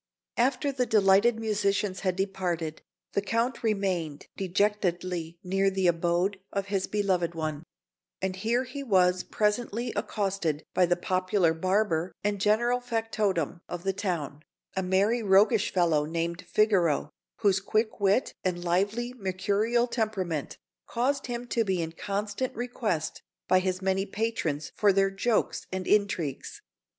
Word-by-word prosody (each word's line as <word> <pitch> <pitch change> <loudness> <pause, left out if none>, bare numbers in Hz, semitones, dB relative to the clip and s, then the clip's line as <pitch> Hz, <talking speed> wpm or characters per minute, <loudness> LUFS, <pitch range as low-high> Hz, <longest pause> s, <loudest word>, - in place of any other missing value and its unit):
After 265 +4 +2
the 255 -2 -1
delighted 215 +2 +4
musicians 205 -3 0
had 185 -2 0
departed, 180 -5 -2 0.3
the 200 - +1
Count 230 +4 -1
remained 190 -9 -1
dejectedly 180 -3 -1
near 195 +1 +2
the 190 -1 -1
abode 175 +3 +1
of 200 -1 -2
his 195 -2 0
beloved 185 -5 0
one; 155 -2 -3 0.6
and 190 0 -2
here 230 +5 +1
he 260 +2 -7
was 185 -7 +3
presently 230 +2 -1
accosted 190 -7 -1
by 180 -1 +4
the 175 - +3
popular 185 -1 +1
barber 185 0 0
and 205 -1 -1
general 235 +4 +3
factotum 215 - -1
of 175 0 -5
the 195 0 0
town, 170 -8 -3 0.3
a 190 - +1
merry 195 +6 +2
roguish 210 +2 +4
fellow 165 -5 +2
named 170 +2 -3
Figaro, 185 -6 +2 0.3
whose 195 -3 +4
quick 215 +3 -1
wit 200 +5 +2
and 175 -2 -1
lively 205 +8 0
mercurial 205 +3 0
temperament 195 - -2 0.3
caused 270 +4 0
him 240 0 -4
to 230 - +2
be 190 -4 0
in 165 -1 -2
constant 205 +7 -3
request 225 -9 -2 0.3
by 185 - +5
his 185 0 -2
many 195 +1 +1
patrons 195 -9 -2
for 205 -1 +4
their 195 0 +2
jokes 215 +4 0
and 185 0 -3
intrigues. 200 -9 0
195 Hz, 140 wpm, -28 LUFS, 180-220 Hz, 0.6 s, by